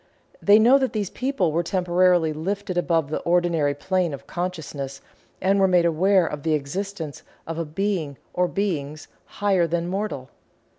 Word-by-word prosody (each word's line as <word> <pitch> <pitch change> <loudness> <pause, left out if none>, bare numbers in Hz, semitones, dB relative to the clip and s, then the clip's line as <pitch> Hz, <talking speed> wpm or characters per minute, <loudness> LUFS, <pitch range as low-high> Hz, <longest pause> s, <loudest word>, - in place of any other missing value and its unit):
They 205 +1 +6
know 245 +5 +6
that 260 -1 -1
these 205 -4 -2
people 255 - 0
were 165 +3 +1
temporarily 180 -2 +2
lifted 190 +4 -3
above 165 -4 +1
the - - -1
ordinary 170 -4 +1
plane 180 0 -1
of - - -15
consciousness 155 -6 -5 0.4
and 195 +1 +2
were 190 - +5
made 180 -2 +3
aware 180 +3 +3
of 150 -2 -4
the 155 +1 +1
existence 160 +2 -5 0.2
of 165 0 -5
a 165 - -2
Being 160 -3 -2 0.2
or 180 0 +2
Beings 155 -7 -3 0.2
higher 195 -4 +1
than 170 +1 -1
mortal. 185 -9 -4
175 Hz, 160 wpm, -24 LUFS, 155-195 Hz, 0.4 s, They